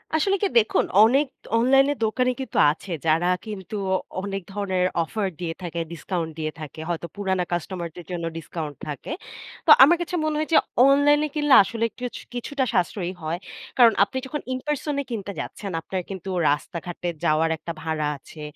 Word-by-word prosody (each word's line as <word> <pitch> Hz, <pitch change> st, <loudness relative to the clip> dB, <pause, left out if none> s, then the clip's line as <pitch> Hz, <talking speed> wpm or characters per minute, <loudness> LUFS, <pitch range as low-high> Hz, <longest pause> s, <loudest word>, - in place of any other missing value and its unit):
আসলে 390 Hz, +6 st, +2 dB
কি -, -, +4 dB
দেখুন 220 Hz, -2 st, +3 dB, 0.2 s
অনেক 270 Hz, +6 st, +4 dB, 0.3 s
অনলাইনে 270 Hz, +4 st, +4 dB
দোকানে 250 Hz, +3 st, +2 dB
কিন্তু 265 Hz, -, -5 dB
আছে 175 Hz, +5 st, -9 dB
যারা 165 Hz, +2 st, +3 dB, 0.2 s
কিন্তু 210 Hz, -2 st, -6 dB, 0.5 s
অনেক 195 Hz, 0 st, -4 dB
ধরনের 190 Hz, -2 st, 0 dB, 0.2 s
অফার 200 Hz, +4 st, -2 dB
দিয়ে 170 Hz, -2 st, -3 dB
থাকে, 170 Hz, -1 st, -4 dB
ডিসকাউন্ট 170 Hz, -1 st, -3 dB
দিয়ে 155 Hz, 0 st, -2 dB
থাকে 155 Hz, 0 st, -8 dB
হয়তো 170 Hz, 0 st, -2 dB
পুরানা 190 Hz, -3 st, 0 dB
কাস্টমারদের 175 Hz, -1 st, -4 dB
জন্য 170 Hz, -2 st, -3 dB
ডিসকাউন্ট 155 Hz, -2 st, -6 dB
থাকে। 150 Hz, -, -6 dB, 0.5 s
তো 320 Hz, -, +6 dB
আমার 340 Hz, +6 st, +6 dB
কাছে 345 Hz, +1 st, -3 dB
মনে 310 Hz, -1 st, 0 dB
হয়েছে 310 Hz, +1 st, +3 dB, 0.3 s
অনলাইনে 290 Hz, +2 st, +4 dB
কিনলে 295 Hz, -2 st, +5 dB
আসলে 230 Hz, +3 st, -2 dB
কিছ 250 Hz, -1 st, -4 dB, 0.2 s
কিছুটা 265 Hz, +3 st, -2 dB
সাশ্রয়ী 180 Hz, 0 st, 0 dB
হয়। 160 Hz, +2 st, -2 dB, 0.4 s
কারণ 235 Hz, -3 st, +7 dB
আপনি 200 Hz, +6 st, -3 dB
যখন 295 Hz, +3 st, -4 dB
ইনপার্সন 295 Hz, +2 st, -2 dB
এ -, -, -5 dB
কিনতে 205 Hz, -3 st, -4 dB
যাচ্ছেন 200 Hz, -2 st, -5 dB
আপনার 185 Hz, +2 st, -3 dB
কিন্তু 190 Hz, -1 st, -6 dB, 0.2 s
রাস্তাঘাটে 170 Hz, +4 st, -3 dB, 0.2 s
যাওয়ার 155 Hz, +1 st, +3 dB
একটা 165 Hz, +2 st, -6 dB
ভাড়া 160 Hz, -2 st, -1 dB
আছে, 150 Hz, +3 st, -13 dB
195 Hz, 160 wpm, -24 LUFS, 170-260 Hz, 0.5 s, কারণ